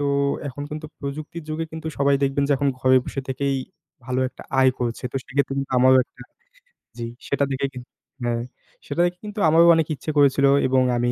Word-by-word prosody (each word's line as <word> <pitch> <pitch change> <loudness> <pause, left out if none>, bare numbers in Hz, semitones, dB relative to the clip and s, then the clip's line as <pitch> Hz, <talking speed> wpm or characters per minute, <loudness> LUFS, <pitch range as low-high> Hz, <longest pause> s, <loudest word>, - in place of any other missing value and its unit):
তো, 145 - 0 0.4
এখন 145 +2 -7
কিন্তু 155 +1 -5
প্রযুক্তির 155 +3 -6
যুগে 160 +1 -2
কিন্তু 160 0 -7
সবাই 140 0 +3
দেখবেন 140 +1 +1
যে - - +4
এখন 140 +1 +1
ঘরে 130 0 +5
বসে 135 - -4
থেকেই, 135 +1 -1 0.5
ভালো 130 +1 -1
একটা - - -13 0.2
আয় 130 - +6
করছে। 120 -1 -3
তো - - -2
সেক্ষেত্রে 135 0 -1
কিন্তু 135 0 -3
আমারও 130 +1 +6
একটা - - -16 0.8
জি 115 - -3 0.2
সেটা 140 0 +1
দেখে 135 +1 -1
কিন 125 - -7 0.4
হ্যাঁ 120 -1 -1 0.4
সেটা 145 +4 0
দেখে 175 0 -2
কিন্তু 210 0 -6
আমারও 165 +2 +6
অনেক 160 -2 +1
ইচ্ছে 145 +4 -4
করেছিল 140 -1 +4 0.2
এবং 130 0 +3 0.2
আমি 120 0 +1
140 Hz, 195 wpm, -23 LUFS, 130-150 Hz, 0.8 s, আয়